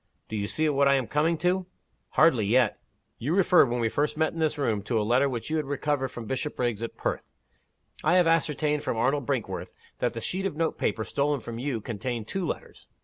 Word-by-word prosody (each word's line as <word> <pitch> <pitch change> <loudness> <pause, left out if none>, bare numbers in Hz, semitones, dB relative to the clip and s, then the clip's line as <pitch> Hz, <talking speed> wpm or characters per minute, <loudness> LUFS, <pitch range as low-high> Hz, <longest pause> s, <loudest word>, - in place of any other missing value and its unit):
"Do 110 - -4
you 100 -1 -1
see 155 +9 +1
what 140 -1 +3
I 140 - +5
am 130 -2 0
coming 155 +6 +1
to?" 180 0 +1 0.5
"Hardly 120 -11 +5
yet." 120 0 +3 0.4
"You 145 +9 0
referred, 180 -7 +5
when 120 +1 -1
we 115 - +2
first 150 +6 -1
met 160 0 +1
in 165 - -6
this 155 -2 +1
room, 115 -8 0
to 110 +3 0
a - - +1
letter 125 +5 +3
which 125 +3 -4
you 160 0 +2
recovered 145 -1 -1
from 120 -2 -8
Bishopriggs, 125 -3 -2
at 115 - -5
Perth. - - -3 0.7
I 165 +3 +4
have 180 -1 +5
ascertained 150 -2 +1
from - - -2
Arnold 135 +2 +1
Brinkworth - - -3 0.2
that 120 - 0
the 115 - -4
sheet 190 +10 -1
of 170 - -6
note 165 +1 -1
paper 110 +1 0
stolen 145 +4 0
from 115 0 -7
you 125 -3 -2
contained 115 0 -4
two 190 -3 -2
letters. - - -6
140 Hz, 215 wpm, -27 LUFS, 115-155 Hz, 0.7 s, I